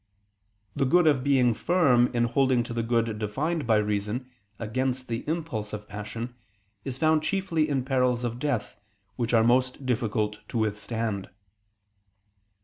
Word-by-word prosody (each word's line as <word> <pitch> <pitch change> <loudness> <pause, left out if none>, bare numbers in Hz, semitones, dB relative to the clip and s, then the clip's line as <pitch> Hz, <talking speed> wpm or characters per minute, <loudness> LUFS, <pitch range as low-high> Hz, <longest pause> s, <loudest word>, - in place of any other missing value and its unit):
The 135 - +1
good 175 +5 +4
of 145 -5 +3
being 130 -4 +4
firm 130 -4 +3
in 120 -1 0
holding 130 0 +2
to 120 - -6
the 115 - -1
good 115 -2 0
defined 145 +9 -2
by 110 - +4
reason, 105 +4 -1 0.3
against 130 +3 -2
the 115 0 -3
impulse 150 -11 -3
of 105 0 -6
passion, 110 +4 -6 0.5
is 135 -2 -4
found 155 +1 +3
chiefly 165 -3 0
in 135 -3 0
perils 125 -2 +1
of 120 0 -3
death, 130 -7 -2 0.4
which 120 -2 -2
are 115 -2 +5
most 125 +3 +2
difficult 110 -4 -1
to - - -4
withstand. 110 -1 -2
120 Hz, 145 wpm, -27 LUFS, 110-135 Hz, 0.5 s, are